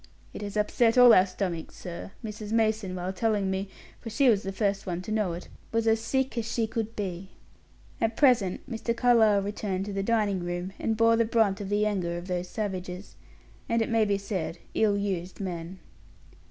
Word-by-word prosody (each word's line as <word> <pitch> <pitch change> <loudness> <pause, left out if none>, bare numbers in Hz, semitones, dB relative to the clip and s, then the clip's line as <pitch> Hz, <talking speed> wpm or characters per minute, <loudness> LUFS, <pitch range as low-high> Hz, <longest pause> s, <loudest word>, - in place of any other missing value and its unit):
It - - -7
has 205 0 -4
upset 225 +3 +2
all 245 -2 +9
our 185 +1 +6
stomachs, 185 -3 -4
sir; 175 +1 -7 0.2
Mrs. 215 0 -6
Mason 220 -4 +1
while 180 +1 -3
telling 205 -1 0
me 190 +1 -2 0.3
for 230 - -7
she 255 +4 +3
was 210 -4 +3
the 195 - -4
first 200 0 -1
one 175 -1 -2
to 215 - -6
know 210 -5 0
it 175 - -7 0.2
was 230 0 0
as 225 0 +4
sick 265 +2 -1
as 230 - -4
she 230 - +1
could 225 0 -4
be." 190 -2 -4 0.7
At 225 0 0
present 245 -10 +3
Mr. 235 -1 -3
Carlyle 220 -5 +4
returned 195 -2 -3
to 205 - -5
the 195 - -1
dining 210 -2 +1
room, 175 +2 -4
and 220 -1 -1
bore 230 0 +5
the 230 - +4
brunt 220 -3 +2
of 195 - -5
the 205 +1 +2
anger 180 -5 -1
of 175 - -7
those 180 -1 -3
savage, 190 -4 -3
and 195 +4 -7
it 225 - 0
may 225 -2 +3
be 200 -1 +1
said, 190 -4 -4 0.2
ill 210 -2 +2
used 190 -3 -3
men. 180 -1 -5
205 Hz, 200 wpm, -28 LUFS, 185-225 Hz, 0.7 s, all